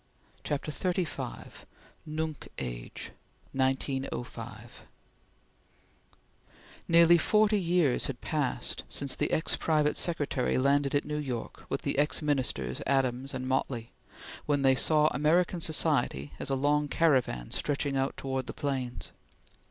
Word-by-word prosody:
CHAPTER 145 Hz, +1 st, -2 dB
XXXV 180 Hz, 0 st, -3 dB, 0.4 s
NUNC 155 Hz, -1 st, -4 dB
AGE -, -, -6 dB, 0.4 s
(1905) 125 Hz, -4 st, -3 dB, 2.0 s
NEARLY 170 Hz, 0 st, +7 dB
forty 215 Hz, +3 st, +3 dB
years 170 Hz, -6 st, +2 dB
had 135 Hz, -2 st, -5 dB
passed 150 Hz, -5 st, -1 dB
since 140 Hz, -2 st, -1 dB
the -, -, 0 dB
ex 160 Hz, -, +1 dB
private 150 Hz, -2 st, +2 dB
secretary 145 Hz, -6 st, 0 dB
landed 140 Hz, +1 st, +2 dB
at 145 Hz, -, +1 dB
New 150 Hz, 0 st, -2 dB
York 130 Hz, -6 st, -5 dB
with -, -, -2 dB
the -, -, 0 dB
ex 150 Hz, +1 st, +1 dB
Ministers 125 Hz, -, -1 dB
Adams 135 Hz, 0 st, 0 dB
and 130 Hz, 0 st, -4 dB
Motley, 130 Hz, -3 st, -1 dB, 0.6 s
when 145 Hz, -2 st, +2 dB
they 135 Hz, -1 st, +6 dB
saw 150 Hz, +3 st, +3 dB
American 170 Hz, +5 st, +2 dB
society 75 Hz, -, +1 dB
as -, -, -2 dB
a 135 Hz, -, +1 dB
long 145 Hz, +2 st, +2 dB
caravan 130 Hz, -, +1 dB
stretching 145 Hz, -1 st, -1 dB
out 135 Hz, 0 st, 0 dB
towards 130 Hz, -1 st, -3 dB
the -, -, -5 dB
plains. 130 Hz, -4 st, -3 dB
140 Hz, 120 wpm, -29 LUFS, 130-155 Hz, 2.0 s, NEARLY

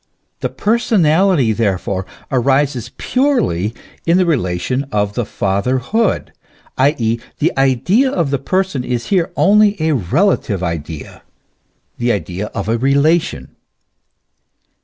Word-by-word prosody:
The -, -, -2 dB
personality, 185 Hz, -, +2 dB
therefore, 95 Hz, -3 st, -1 dB, 0.2 s
arises 135 Hz, -1 st, +1 dB
purely 230 Hz, -, 0 dB, 0.3 s
in 170 Hz, +2 st, +3 dB
the 185 Hz, -, +3 dB
relation 125 Hz, -, -1 dB
of 105 Hz, -1 st, 0 dB
the 120 Hz, 0 st, -2 dB
Fatherhood; 125 Hz, -, -1 dB, 0.4 s
i. 140 Hz, +4 st, +3 dB
e., 115 Hz, 0 st, 0 dB, 0.2 s
the 160 Hz, -, +1 dB
idea 135 Hz, -, +2 dB
of 170 Hz, -, -1 dB
the 140 Hz, -, 0 dB
person 185 Hz, -2 st, -1 dB
is 120 Hz, -1 st, -3 dB
here 180 Hz, -4 st, +1 dB
only 210 Hz, 0 st, +4 dB
a 160 Hz, 0 st, +1 dB
relative 120 Hz, -, +1 dB
idea, 80 Hz, -3 st, -5 dB, 0.8 s
the 120 Hz, 0 st, +1 dB
idea 100 Hz, 0 st, -3 dB
of 100 Hz, -1 st, -5 dB
a 115 Hz, +1 st, 0 dB
relation. 140 Hz, -, +1 dB
130 Hz, 115 wpm, -17 LUFS, 105-175 Hz, 0.8 s, only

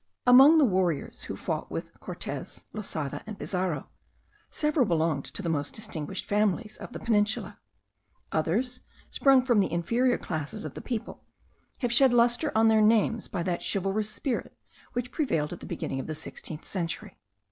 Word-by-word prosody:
Among 265 Hz, +6 st, +8 dB
the 300 Hz, -, +6 dB
warriors 185 Hz, -, 0 dB
who -, -, -5 dB
fought -, -, -3 dB
with -, -, -5 dB
Cortez, -, -, -6 dB
Losada, 160 Hz, -9 st, -4 dB
and 215 Hz, -2 st, -6 dB
Pizarro, 180 Hz, -6 st, -2 dB, 0.6 s
several 300 Hz, -5 st, +1 dB
belonged 160 Hz, -5 st, +1 dB
to 200 Hz, -, -7 dB
the -, -, -2 dB
most 145 Hz, -3 st, -1 dB
distinguished 190 Hz, -4 st, -4 dB
families 210 Hz, +1 st, 0 dB
of -, -, -9 dB
the -, -, -6 dB
Peninsula; 210 Hz, -2 st, 0 dB, 0.7 s
others, 230 Hz, +11 st, 0 dB, 0.3 s
sprung 270 Hz, -2 st, +4 dB
from 240 Hz, -5 st, +4 dB
the 195 Hz, -, +1 dB
inferior 235 Hz, +9 st, +2 dB
classes 165 Hz, +7 st, -5 dB
of -, -, -6 dB
the -, -, -7 dB
people, 230 Hz, -3 st, -5 dB, 0.6 s
have 245 Hz, -2 st, 0 dB
shed 260 Hz, 0 st, +5 dB
lustre 240 Hz, +5 st, +3 dB
on 225 Hz, +1 st, +5 dB
their 220 Hz, -1 st, +5 dB
names, 220 Hz, +1 st, +3 dB
by 175 Hz, -4 st, -3 dB
that 175 Hz, 0 st, -1 dB
chivalrous 195 Hz, +2 st, 0 dB
spirit 250 Hz, +3 st, -3 dB, 0.4 s
which 245 Hz, 0 st, -3 dB
prevailed 165 Hz, -, 0 dB
at 175 Hz, -, -8 dB
the -, -, -9 dB
beginning 135 Hz, -, -3 dB
of -, -, -5 dB
the 155 Hz, -, -3 dB
sixteenth 155 Hz, 0 st, -6 dB
century. 170 Hz, -4 st, -4 dB
210 Hz, 165 wpm, -28 LUFS, 170-240 Hz, 0.7 s, Among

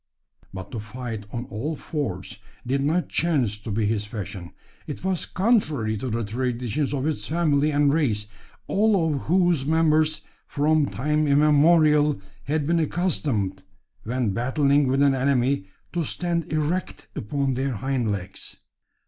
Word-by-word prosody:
But 95 Hz, +1 st, -8 dB
to 115 Hz, -, -4 dB
fight 110 Hz, -1 st, -6 dB
on 120 Hz, +1 st, -4 dB
"all 140 Hz, +10 st, -3 dB
fours" 135 Hz, -, -4 dB, 0.3 s
did 135 Hz, +3 st, 0 dB
not 160 Hz, +5 st, +1 dB
chance 135 Hz, -11 st, 0 dB
to 105 Hz, -, -8 dB
be 105 Hz, +1 st, 0 dB
his 105 Hz, 0 st, 0 dB
fashion. 100 Hz, -5 st, -7 dB, 0.4 s
It -, -, -6 dB
was 190 Hz, -2 st, -1 dB
contrary 155 Hz, -, +1 dB
to 130 Hz, +5 st, -4 dB
the 115 Hz, +1 st, -1 dB
traditions 125 Hz, +4 st, -2 dB
of 140 Hz, -3 st, -1 dB
his 155 Hz, 0 st, -2 dB
family 155 Hz, -2 st, +2 dB
and 145 Hz, -1 st, +3 dB
race 115 Hz, -10 st, +1 dB, 0.4 s
all 195 Hz, -6 st, +2 dB
of 140 Hz, -, -2 dB
whose 175 Hz, -4 st, +3 dB
members, 155 Hz, 0 st, +2 dB, 0.3 s
from 150 Hz, 0 st, +2 dB
time 150 Hz, +4 st, 0 dB
immemorial, 150 Hz, 0 st, +4 dB, 0.3 s
had 150 Hz, +1 st, 0 dB
been 170 Hz, +2 st, +2 dB
accustomed, 140 Hz, -, 0 dB, 0.4 s
when 120 Hz, -2 st, -1 dB
battling 140 Hz, +5 st, +2 dB
with 135 Hz, +2 st, +2 dB
an 140 Hz, -1 st, +5 dB
enemy, 130 Hz, -4 st, +1 dB, 0.3 s
to 175 Hz, -1 st, 0 dB
stand 170 Hz, +2 st, -1 dB
erect 155 Hz, +4 st, -2 dB
upon 135 Hz, +5 st, -1 dB
their 135 Hz, +1 st, -1 dB
hind 125 Hz, -1 st, -1 dB
legs. 95 Hz, -3 st, -5 dB
140 Hz, 145 wpm, -24 LUFS, 115-155 Hz, 0.4 s, an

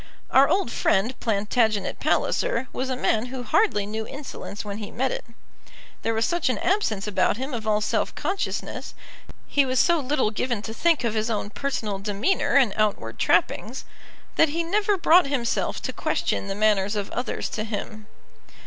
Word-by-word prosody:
Our 270 Hz, +1 st, +6 dB
old 380 Hz, -12 st, +1 dB
friend 220 Hz, +4 st, +1 dB
Plantagenet 215 Hz, -1 st, 0 dB
Palliser -, -, +1 dB
was 260 Hz, +1 st, -2 dB
a 260 Hz, -, 0 dB
man 225 Hz, -2 st, +1 dB
who 250 Hz, 0 st, -6 dB
hardly 245 Hz, -, +2 dB
knew 220 Hz, +1 st, -4 dB
insolence 270 Hz, -7 st, -7 dB
when 205 Hz, 0 st, -5 dB
he 210 Hz, -, -6 dB
met 260 Hz, +2 st, -1 dB
it. -, -, -4 dB, 0.8 s
There 225 Hz, -, 0 dB
was 225 Hz, -, +2 dB
such 345 Hz, -5 st, +1 dB
an 250 Hz, -, 0 dB
absence 235 Hz, -, 0 dB
about 205 Hz, 0 st, +1 dB
him 265 Hz, +3 st, -4 dB
of 225 Hz, -2 st, -4 dB
all 210 Hz, 0 st, +2 dB
self 220 Hz, +2 st, -1 dB
consciousness, 380 Hz, +6 st, -3 dB, 0.5 s
he 285 Hz, -, +3 dB
was 260 Hz, -1 st, 0 dB
so 340 Hz, -1 st, +4 dB
little 265 Hz, -5 st, 0 dB
given 225 Hz, 0 st, -2 dB
to 220 Hz, -, -5 dB
think 330 Hz, +2 st, +2 dB
of 230 Hz, -2 st, 0 dB
his 220 Hz, +1 st, -1 dB
own 210 Hz, -2 st, -2 dB
personal 220 Hz, -8 st, -2 dB
demeanour 210 Hz, -, 0 dB
and 255 Hz, -8 st, +5 dB
outward 215 Hz, -1 st, -1 dB
trappings, -, -, +1 dB, 0.5 s
that 320 Hz, -, +5 dB
he 335 Hz, +3 st, -1 dB
never 405 Hz, +3 st, +1 dB
brought 345 Hz, -1 st, +5 dB
himself 255 Hz, -5 st, -1 dB
to -, -, -3 dB
question -, -, -1 dB
the 195 Hz, -, -3 dB
manners 205 Hz, -1 st, +2 dB
of 205 Hz, -1 st, -3 dB
others 245 Hz, -1 st, -2 dB
to 215 Hz, -, -3 dB
him. 215 Hz, 0 st, -6 dB
230 Hz, 175 wpm, -25 LUFS, 210-280 Hz, 0.8 s, Our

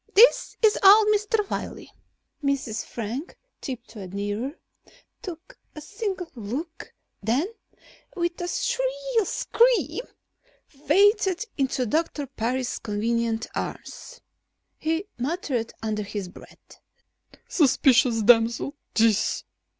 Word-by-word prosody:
This 460 Hz, +5 st, +6 dB
is 430 Hz, -1 st, +5 dB
old 415 Hz, +2 st, +8 dB
Mr. 420 Hz, 0 st, +1 dB
Wiley." -, -, -5 dB, 0.5 s
Mrs. 265 Hz, -6 st, -1 dB
Frank 240 Hz, -, -6 dB, 0.2 s
tiptoed 225 Hz, -, -7 dB
nearer, 205 Hz, +7 st, -3 dB, 0.7 s
took 345 Hz, -2 st, -9 dB, 0.2 s
a -, -, -6 dB
single 390 Hz, 0 st, -4 dB
look, 270 Hz, -, -6 dB, 0.3 s
then 235 Hz, -, +1 dB, 0.7 s
with 345 Hz, -1 st, -2 dB
a 350 Hz, -, -2 dB
shrill -, -, 0 dB
scream 475 Hz, +5 st, +2 dB, 0.6 s
fainted 395 Hz, -, +2 dB
into 265 Hz, -2 st, 0 dB
Doctor 300 Hz, +3 st, -1 dB
Parris's 255 Hz, 0 st, -2 dB
convenient 225 Hz, +2 st, -1 dB
arms. -, -, -6 dB, 0.6 s
He 325 Hz, +4 st, -1 dB
muttered 260 Hz, -4 st, -2 dB
under 215 Hz, -1 st, -1 dB
his 200 Hz, -2 st, -5 dB
breath: -, -, -16 dB, 0.7 s
"Superstitious 255 Hz, -6 st, +4 dB
damsel, 235 Hz, +4 st, +4 dB, 0.2 s
this." 220 Hz, -2 st, +2 dB
280 Hz, 95 wpm, -25 LUFS, -, 0.7 s, old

